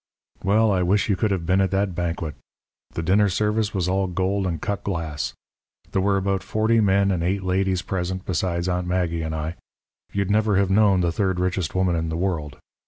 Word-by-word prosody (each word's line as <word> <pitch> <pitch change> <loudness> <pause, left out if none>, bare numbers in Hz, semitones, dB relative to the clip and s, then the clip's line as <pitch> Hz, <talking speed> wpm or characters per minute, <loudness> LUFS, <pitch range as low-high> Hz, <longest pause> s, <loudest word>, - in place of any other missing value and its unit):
"Well, 105 +3 +3
I 95 -2 +2
wish 100 +5 +2
you 100 - +3
could 110 +3 0
have 95 -4 -1
been 95 +3 +3
at 95 - +2
that 95 0 0
banquet. 85 -2 -3 0.6
The 85 - -4
dinner 100 +4 +3
service 105 +2 0
was 90 -3 -1
all 95 +1 +1
gold 95 +2 -1
and 85 -3 -2
cut 100 +4 -3
glass. 80 -6 -3 0.6
There 95 - +1
were 100 0 +2
about 95 0 0
forty 110 +4 +1
men 100 -1 +3
and 90 -3 0
eight 95 +2 0
ladies 95 0 0
present 95 0 -3
besides 85 0 -1
Aunt 90 0 -1
Maggie 90 -2 0
and 80 0 -3
I. 80 +2 -4 0.5
You'd 100 0 -1
never 105 -1 +2
have 100 -1 +2
known 100 -2 +4
the 85 -1 +1
third 95 0 0
richest 90 -2 -1
woman 95 -2 +2
in 80 0 -1
the 80 - -2
world. 85 -6 -2
95 Hz, 205 wpm, -23 LUFS, 85-100 Hz, 0.6 s, known